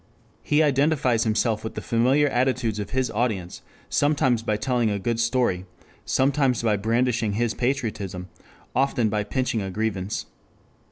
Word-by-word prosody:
He 150 +1 +2
identifies 140 -5 +2
himself 110 0 +1
with 110 - -6
the - - -3
familiar 130 +6 +2
attitudes 125 -4 0
of 100 - -4
his 130 -1 -1
audience, 105 -6 -2 0.3
sometimes 135 -5 +2
by 110 -2 -1
telling 120 -1 0
a 100 - -1
good 115 +3 -2
story, 115 -6 +1 0.4
sometimes 130 -3 +1
by 110 -2 +2
brandishing 115 +1 0
his 115 +1 0
patriotism, 110 -8 -2 0.5
often 130 -4 +2
by 105 0 0
pinching 120 0 -1
a 95 - -4
grievance. 100 -1 -2
115 Hz, 145 wpm, -24 LUFS, 105-130 Hz, 0.5 s, He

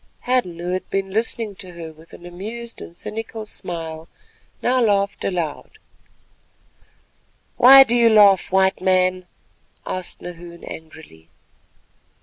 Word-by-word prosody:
Hadden, 245 -9 0
who 175 +1 -4
had 185 0 -3
been 195 0 -2
listening 220 0 -2
to 185 -3 -10
her 165 -2 -9
with 160 +2 -19
an 175 - -13
amused 220 +7 -8
and 170 - -11
cynical 220 0 -6
smile, 165 -5 -7 0.6
now 255 +1 +2
laughed 200 -3 +1
aloud. 175 - -4 1.8
"Why 270 +2 +10
do 240 -2 0
you 235 -1 +5
laugh, 205 -5 +5
White 190 0 +2
Man?" 185 -1 +1 0.6
asked 185 -1 -5
Nahoon 170 -1 -10
angrily. 155 - -12
185 Hz, 125 wpm, -21 LUFS, 170-220 Hz, 1.8 s, Why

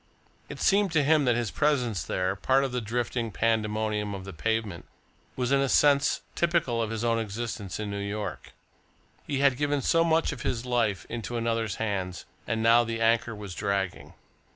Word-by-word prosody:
It - - -8
seemed 200 -2 +3
to 150 -3 +3
him 150 0 +3
that 120 -2 +3
his 120 -2 -1
presence 125 - +1
there, 95 +2 -1
part 130 +7 +2
of 135 - -2
the 125 0 -2
drifting 120 +1 -2
pandemonium 110 -1 0
of 95 -1 -8
the 100 - -8
pavement, 110 0 -2 0.5
was 125 0 -1
in 140 0 +4
a 135 - +1
sense 140 0 +4
typical 170 -9 +1
of 110 - -1
his 115 0 -3
own 115 -1 +2
existence 110 -2 -4
in 105 -1 -3
New 100 - -3
York. 100 -1 -5 0.7
He 140 -2 -1
had 140 -3 +4
given 145 -1 0
so 165 0 +3
much 165 -1 +2
of 135 -4 -7
his 120 -1 -2
life 120 -5 0
into 120 +1 -4
another's 115 -3 -1
hands 95 -5 -3 0.2
and 110 -1 -1
now 115 +1 +6
the 115 0 -3
anchor 115 0 +2
was 105 -3 -7
dragging. 100 -1 -3
115 Hz, 185 wpm, -27 LUFS, 105-130 Hz, 0.7 s, now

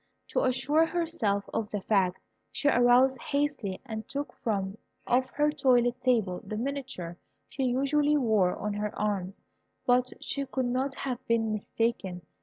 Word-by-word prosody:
To - - +1
assure 265 +5 +3
herself 320 -14 -1
of 220 -2 -1
the 205 - -3
fact, 190 -3 +1 0.3
she 290 - -1
arose 250 0 +5
hastily 280 -8 -1
and 220 -3 -6
took 285 +1 -4
from 200 -2 -2 0.3
off 255 +1 +2
her 295 +1 +2
toilet 250 -4 +2
table 220 -9 +1
the 215 - -5
miniature 250 -9 -4 0.3
she 265 - -2
usually 285 +4 +2
wore 215 -9 +2
on 210 0 -3
her 210 0 -3
arm; 200 -3 -1 0.6
but 250 0 +3
she 280 -1 -2
could 260 -1 -1
not 260 +3 -1
have 255 -2 -4
been 225 -1 +2
mistaken. 205 -4 -2
245 Hz, 150 wpm, -29 LUFS, 210-270 Hz, 0.6 s, arose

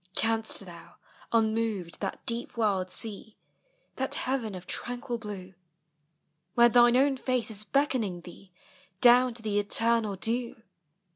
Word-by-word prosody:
Canst 225 -2 0
thou 170 -2 -13 0.4
unmoved 220 -6 0
that 195 - -5
deep 235 0 -3
world 195 -5 +1
see, 220 +1 -7 0.6
That 265 0 -1
heaven 245 -6 -2
of 180 0 -9
tranquil 245 +3 -4
blue, 195 -4 -8 1.0
Where 240 0 +7
thine 240 +1 +6
own 270 0 +3
face 255 -3 -1
is 210 -1 -7
beckoning 225 -7 0
thee 180 +2 -14 0.5
Down 245 +1 +6
to 230 - -9
the 205 -1 +1
eternal 225 0 +1
dew? 230 +3 -2
225 Hz, 130 wpm, -28 LUFS, 200-240 Hz, 1.0 s, Where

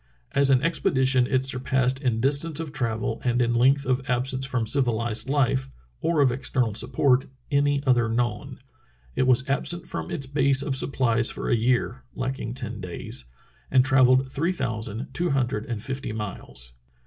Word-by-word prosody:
As 140 0 +3
an 130 -1 +4
expedition 130 -6 +2
it 130 0 +1
surpassed 130 0 0
in 120 -5 0
distance 140 +5 0
of 160 -3 -5
travel 115 -5 -2
and 120 -1 +1
in 120 -1 +2
length 135 +4 +3
of 130 0 +1
absence 130 +2 0
from 125 -4 -1
civilized 115 -1 0
life, 135 -2 +1 0.3
or 165 -3 +1
of 135 -3 +4
external 125 -3 0
support, 125 +3 +2 0.2
any 145 0 +2
other 120 -3 +3
known. 115 -2 -2 0.6
It 130 - +1
was 130 +1 +3
absent 170 +5 -1
from 80 0 -5
its 140 - -2
base 135 0 +2
of 135 - -2
supplies 120 -4 +1
for - - -3
a - - +4
year 120 +2 0
(lacking 130 -2 -4
ten 120 -4 -6
days), 90 -8 -5 0.4
and 130 -1 +4
travelled 130 0 +4
three 165 +7 0
thousand 115 - -4
two 175 0 0
hundred 135 0 -1
and 115 -4 -4
fifty 135 -4 -4
miles. 95 - -7
130 Hz, 165 wpm, -25 LUFS, 120-135 Hz, 0.6 s, an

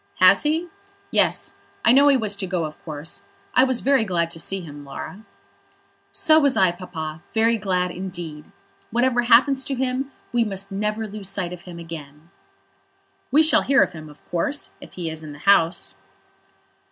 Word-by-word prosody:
"Has - - +6
he? 315 +4 0 0.4
Yes; - - +2 0.3
I 230 - +7
know 280 +3 +6
he 280 -2 +6
was 215 -4 -2
to 195 -1 -3
go, 180 -2 -1
of 155 0 -9
course. 155 0 -5 0.3
I 255 - +6
was 260 -2 +1
very 270 -3 +3
glad 170 -5 -1
to 165 - -6
see 195 +3 -2
him, 145 -4 -10
Laura." 160 +8 -8 0.9
"So 315 -1 +5
was 280 -3 +2
I, 185 -2 +5
Papa; 160 -3 -7
very 225 0 +3
glad 180 -3 0
indeed. 175 -5 -6 0.4
Whatever 240 +1 +2
happens 265 +3 +4
to 275 - -2
him, 260 +1 -2 0.2
we 240 -1 +3
must 195 -2 -4
never 210 +2 -2
lose 205 -2 -4
sight 185 -3 -2
of 180 - -11
him 170 - -8
again." 160 -1 -10 1.0
"We 300 +5 +5
shall 315 - +4
hear 275 +1 +4
of - - -4
him, 155 -2 -9
of 150 - -18
course, 225 - -1
if - - -12
he 175 -2 -5
is 160 0 -4
in 155 -2 -8
the - - -11
House." 190 -3 +3
195 Hz, 180 wpm, -23 LUFS, 165-250 Hz, 1.0 s, I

